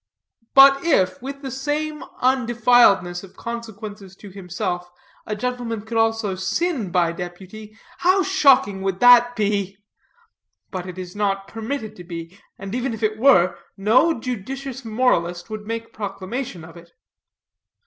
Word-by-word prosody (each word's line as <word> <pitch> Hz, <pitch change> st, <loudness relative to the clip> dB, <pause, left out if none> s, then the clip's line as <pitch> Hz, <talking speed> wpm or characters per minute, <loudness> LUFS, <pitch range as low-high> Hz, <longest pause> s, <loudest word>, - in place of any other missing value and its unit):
But 275 Hz, 0 st, +8 dB
if, 185 Hz, -, +2 dB
with 275 Hz, +2 st, -7 dB
the 265 Hz, -, -5 dB
same 300 Hz, +3 st, -3 dB, 0.2 s
undefiledness 240 Hz, -8 st, +3 dB
of 190 Hz, -, -14 dB
consequences 215 Hz, -4 st, -7 dB
to 200 Hz, 0 st, -12 dB
himself, 180 Hz, -1 st, -4 dB, 0.4 s
a 210 Hz, -, -2 dB
gentleman 240 Hz, -1 st, -3 dB
could 225 Hz, +1 st, -7 dB
also 225 Hz, -3 st, +1 dB
sin 225 Hz, -, -1 dB
by 175 Hz, -2 st, +2 dB
deputy, 190 Hz, +5 st, -9 dB, 0.2 s
how 370 Hz, +5 st, +3 dB
shocking 270 Hz, -, +3 dB
would 190 Hz, -1 st, -2 dB
that 245 Hz, 0 st, +7 dB
be! 200 Hz, -2 st, -1 dB, 0.9 s
But 185 Hz, -1 st, -5 dB
it 185 Hz, 0 st, -8 dB
is 185 Hz, 0 st, -8 dB
not 195 Hz, -1 st, -1 dB
permitted 225 Hz, +1 st, -5 dB
to 180 Hz, -, -9 dB
be; 170 Hz, 0 st, -8 dB, 0.2 s
and 195 Hz, +1 st, -7 dB
even 250 Hz, -1 st, -2 dB
if 220 Hz, -, -9 dB
it 215 Hz, 0 st, 0 dB
were, 185 Hz, -9 st, +4 dB, 0.2 s
no 235 Hz, +10 st, +3 dB
judicious 260 Hz, +3 st, -5 dB
moralist 215 Hz, -6 st, 0 dB
would 215 Hz, -1 st, -6 dB
make 230 Hz, 0 st, -5 dB
proclamation 195 Hz, -1 st, -5 dB
of 165 Hz, +1 st, -14 dB
it. 170 Hz, 0 st, -16 dB
215 Hz, 140 wpm, -22 LUFS, 190-250 Hz, 0.9 s, But